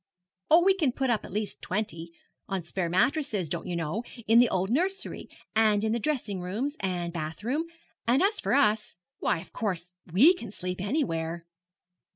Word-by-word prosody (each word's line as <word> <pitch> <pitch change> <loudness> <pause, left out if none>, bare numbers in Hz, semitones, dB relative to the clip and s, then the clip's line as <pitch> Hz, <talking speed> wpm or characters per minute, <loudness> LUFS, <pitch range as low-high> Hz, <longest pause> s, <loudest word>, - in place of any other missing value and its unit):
'Oh, 330 +3 +7
we 385 +1 +6
can 310 -10 +1
put 265 -1 0
up 225 - 0
at - - -10
least 210 +1 -2
twenty 170 -4 -3 0.4
on 195 -3 -2
spare 170 +1 -2
mattresses, 215 - +1
don't 170 - -3
you 175 - -2
know, 170 +7 -2 0.2
in 225 +2 +6
the 245 - +6
old 190 +3 0
nursery, 370 +8 -1 0.3
and 215 -2 +4
in 220 - +1
the 235 - +1
dressing 230 -9 -2
rooms 225 +11 -2
and 175 -3 -2
bath 160 +2 -5
room; 285 +8 0 0.4
and 255 +8 +4
as 410 +2 +2
for - - +1
us, 215 -9 +2 0.2
why, - - +1
of - - -13
course, 180 -5 -3 0.2
we 265 - +7
can 235 - -8
sleep 180 -2 -4
anywhere.' 170 - -1
210 Hz, 185 wpm, -28 LUFS, 180-265 Hz, 0.4 s, Oh